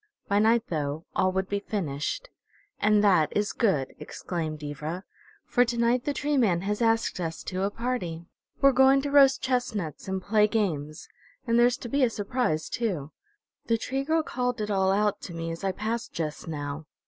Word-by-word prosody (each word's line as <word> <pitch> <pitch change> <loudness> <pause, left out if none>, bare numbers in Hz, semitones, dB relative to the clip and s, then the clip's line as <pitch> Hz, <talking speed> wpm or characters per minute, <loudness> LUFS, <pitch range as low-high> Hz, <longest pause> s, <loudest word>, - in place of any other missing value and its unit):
By 200 +1 +2
night, 225 +2 +4
though, 150 0 -2
all 185 - +2
would 190 0 -1
be 200 +1 -1
finished. 200 - -3 0.5
"And 210 0 +4
that 175 -7 +4
is 210 0 0
good!" 155 - +1
exclaimed 155 -4 -5
Ivra. 150 +5 -5 0.4
"For 245 - +3
to 235 -1 -2
night 235 +1 +2
the 290 - 0
Tree 290 +1 0
Man 190 -9 +3
has 210 +3 -2
asked 225 -4 +1
us 165 -2 -4
to 185 0 -3
a 195 - +1
party. 205 -8 -3 0.4
We're 275 0 +7
going 265 +1 +5
to 285 - -2
roast 275 -2 +6
chestnuts 235 - -2
and 190 0 -1
play 210 +2 +3
games, 160 -9 -2 0.4
and 230 -1 +3
there's 245 +1 +4
to 255 - -7
be 275 +3 +1
a 250 - +4
surprise, 205 -7 -1
too. 175 -11 -2 0.6
The 230 - +3
Tree 270 +4 -2
Girl 320 +2 +1
called 250 -4 -2
it 210 0 -2
all 190 -1 +2
out 205 +1 +1
to 170 - -8
me 165 0 -3
as 165 +3 -7
I 195 - +1
passed 220 +4 -3
just 155 0 -4
now. 145 -1 -5
205 Hz, 190 wpm, -27 LUFS, 165-240 Hz, 0.6 s, We're